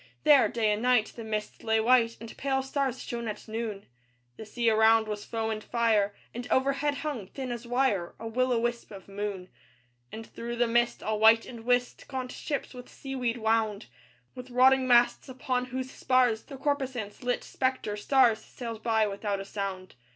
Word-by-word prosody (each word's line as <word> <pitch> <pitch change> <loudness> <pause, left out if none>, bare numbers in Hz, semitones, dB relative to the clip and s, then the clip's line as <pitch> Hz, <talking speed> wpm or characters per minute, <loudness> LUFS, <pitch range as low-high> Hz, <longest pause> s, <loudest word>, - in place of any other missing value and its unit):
There, 295 -3 +6
day 220 -3 +1
and 210 +1 -1
night, 245 -3 +2
the 230 - -7
mist 215 -1 -4
lay 220 0 +2
white, 230 0 +3
And 230 -1 -9
pale 265 -1 -1
stars 265 -1 -2
shone 235 -1 -5
at 215 - -6
noon; 220 -2 -4 0.5
The 220 - -10
sea 235 +1 -2
around 220 0 +5
was 210 -1 -4
foam 225 -1 -2
and 215 -1 -4
fire, 215 -4 +1 0.2
And 245 +1 -6
overhead 275 +2 +1
hung, 250 -11 -3
thin 260 +3 -6
as 240 0 -6
wire, 240 -8 0
A 225 - -6
will 255 +3 0
o' 240 - +3
wisp 235 +1 -2
of 195 -3 -11
moon. 200 -2 -5 0.6
And 225 +1 -7
through 235 +2 -6
the 240 0 +2
mist, 240 +1 +1
all 215 -1 -1
white 225 +1 +6
and 230 -2 -10
whist, 245 0 0
Gaunt 260 -2 -4
ships, 285 -2 -4
with 250 -1 -10
sea 270 -1 -8
weed 245 -2 -1
wound, 220 - 0 0.5
With 250 0 -9
rotting 260 +1 +4
masts, 240 +1 +4
upon 255 -1 -2
whose 260 +1 -5
spars 250 -5 +2
The 275 - -9
corposants 265 -7 -2
lit 245 0 -1
spectre 260 -5 -2
stars, 235 +1 +3
Sailed 230 -3 -7
by 220 -2 +2
without 200 0 -3
a 195 - -6
sound. 195 -2 -5
235 Hz, 190 wpm, -28 LUFS, 220-255 Hz, 0.6 s, There